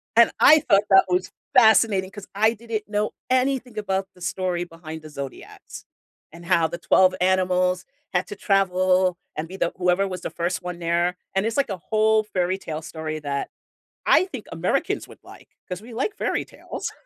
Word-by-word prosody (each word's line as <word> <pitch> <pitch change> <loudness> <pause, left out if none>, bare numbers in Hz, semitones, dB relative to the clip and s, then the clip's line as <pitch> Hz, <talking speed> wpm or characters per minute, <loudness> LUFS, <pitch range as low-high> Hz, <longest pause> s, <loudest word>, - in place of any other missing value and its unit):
And 235 0 +6
I 310 0 +8
thought 200 -6 +3
that 195 -1 +7
was 180 +1 0 0.2
fascinating 220 -5 +5
'cause 205 -2 -10
I 220 +3 +3
didn't 225 -1 -5
know 210 0 -1 0.2
anything 255 -2 0
about 195 -2 -1
the 180 - -20
story 180 0 -2
behind 165 -2 -9
the 155 - -11
zodiacs, 140 -2 -9 0.5
and 170 +2 -13
how 170 -2 +3
the 170 +2 -6
12 185 +2 +4
animals 185 -1 +2 0.3
had 180 0 0
to - - -7
travel 185 -2 +2 0.2
and 155 +2 -4
be 190 +3 -9
the 170 - -1
whoever 180 +2 +2
was 185 -2 -6
the - - -4
1st 175 +2 -2
one 180 -1 -6
there, 175 +1 0 0.2
and 195 +2 +1
it's 225 0 -2
like 280 -4 +1
a 195 - -3
whole 215 +3 +2
fairy 185 -3 -1
tale 160 -5 -6
story 155 -1 -5
that 140 -2 -3 0.6
I - - +5
think - - -8
Americans - - -1
would - - -14
like, - - -16
'cause 180 +2 -5
we 235 +2 -12
like 275 - -2
fairy - - -1
tales. - - -7
185 Hz, 185 wpm, -23 LUFS, 175-210 Hz, 0.6 s, I